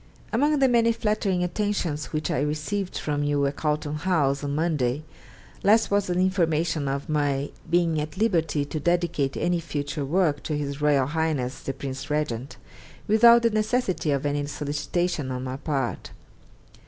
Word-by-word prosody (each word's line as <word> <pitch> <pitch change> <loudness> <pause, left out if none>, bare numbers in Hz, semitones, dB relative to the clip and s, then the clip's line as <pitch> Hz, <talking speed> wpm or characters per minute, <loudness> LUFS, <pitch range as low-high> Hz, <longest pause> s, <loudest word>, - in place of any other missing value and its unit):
Among 295 +6 +3
the 270 -1 +4
many 230 -2 +4
flattering 210 -5 0
attentions 180 -5 -1
which 155 -1 -2
I 130 - 0
received 155 +7 -2
from 145 -1 -2
you 145 -1 +1
at 140 +1 -1
Carlton 150 -1 -1
House 150 -5 +1
on 145 0 -2
Monday 150 -4 0 0.6
last 220 +2 +4
was 200 0 +2
the 180 - -1
information 165 -5 +1
of 140 +1 -2
my 145 -2 0 0.2
being 170 -2 +2
at 150 +4 -6
liberty 165 -9 +1
to 155 +2 -4
dedicate 170 -4 0
any 175 0 +1
future 145 -2 -4
work 150 0 +1
to 150 - -2
His 140 0 -4
Royal 145 -3 +3
Highness 145 -4 -1
the 135 - -4
Prince 135 +1 -6
Regent, 140 -4 -2 0.5
without 235 +2 +7
the 230 - +3
necessity 215 -5 0
of 140 0 0
any 145 0 -1
solicitation 150 +1 -2
on 130 0 -3
my 130 0 -4
part. 140 -4 -2
155 Hz, 160 wpm, -25 LUFS, 145-180 Hz, 0.6 s, without